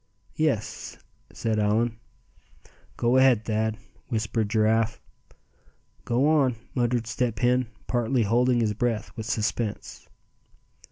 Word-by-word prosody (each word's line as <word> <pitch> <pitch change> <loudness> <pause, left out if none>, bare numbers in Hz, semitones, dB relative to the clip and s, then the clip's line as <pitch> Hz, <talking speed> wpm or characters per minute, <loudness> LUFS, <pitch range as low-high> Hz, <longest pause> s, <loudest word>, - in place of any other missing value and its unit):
"Yes," 150 -9 -1 0.3
said 110 -2 -1
Allan. 110 +2 +1 1.0
"Go 120 +2 +2
ahead, 130 -5 +4
Thad!" 110 0 0 0.3
whispered 110 -2 -1
Giraffe. 110 +1 +2 1.1
"Go 125 +4 +2
on!" 140 -6 +3 0.2
muttered 120 -2 0
Step 115 0 -1
Hen, 125 +2 +2 0.2
partly 120 0 +1
holding 120 +3 +2
his 110 -2 +1
breath 115 0 -2
with 110 -1 -6
suspense. 110 -1 -3
115 Hz, 105 wpm, -26 LUFS, 110-125 Hz, 1.1 s, ahead